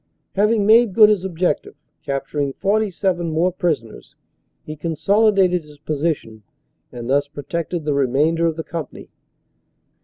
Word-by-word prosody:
Having 210 +1 +2
made 220 -2 +5
good 215 -2 +8
his 205 -4 +1
objective, 180 -4 -2 0.3
capturing 140 0 -3
47 195 -3 0
more 165 +3 +1
prisoners, 160 - -3 0.5
he 155 - -7
consolidated 185 +3 +2
his 150 -1 -16
position 145 -7 -3 0.5
and 120 -1 -7
thus 140 +2 +1
protected 155 +3 -5
the 150 - 0
remainder 145 +5 +1
of 165 - -1
the 160 - -5
company. 160 -2 -7
165 Hz, 125 wpm, -20 LUFS, 145-190 Hz, 0.5 s, good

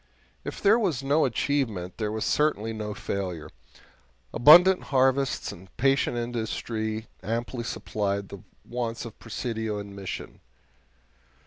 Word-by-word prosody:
If - - -6
there 215 +4 +6
was 165 - 0
no 145 +3 +3
achievement, 115 -8 -1
there 105 -1 -1
was 110 0 -2
certainly 115 -8 +1
no 105 -1 -4
failure. 95 -5 -4 0.8
Abundant 175 +9 +7
harvests 135 0 +1
and 95 +2 -12
patient 135 -1 +2
industry 110 -2 -3 0.2
amply 120 +2 -3
supplied 100 -3 -2
the - - -9 0.2
wants 120 -1 -3
of 115 - -10
Presidio 110 -1 -3
and 100 -1 -7
Mission. 100 -2 -6
115 Hz, 120 wpm, -27 LUFS, 105-135 Hz, 0.8 s, Abundant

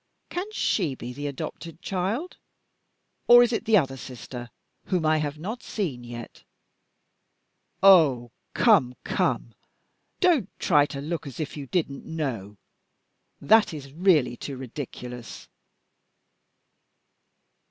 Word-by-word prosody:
Can 380 +4 -4
she 175 - 0
be 125 0 -7
the 145 +3 -5
adopted 160 +4 -7
child? 195 - -3 0.9
Or 240 0 +9
is 240 0 0
it - - -2
the 220 -1 +5
other 135 -6 0
sister, 120 -1 -8 0.4
whom 180 -4 0
I 155 0 +4
have 150 -1 -2
not 215 +10 -5
seen 150 - -4
yet? 120 -1 -9 1.4
Oh, 145 - +6 0.2
come! 160 - +4
come! - - -1 0.7
Don't 325 - +3
try 145 -5 +3
to 140 -2 -6
look 155 +1 -4
as 135 - -9
if 155 -2 -4
you 145 -2 -7
didn't 140 -4 -2
know. 115 -11 -4 0.8
That 215 -6 +4
is 140 -2 -9
really 155 -8 +3
too 135 +2 -7
ridiculous." 125 -2 -8
150 Hz, 120 wpm, -26 LUFS, 130-190 Hz, 1.4 s, Or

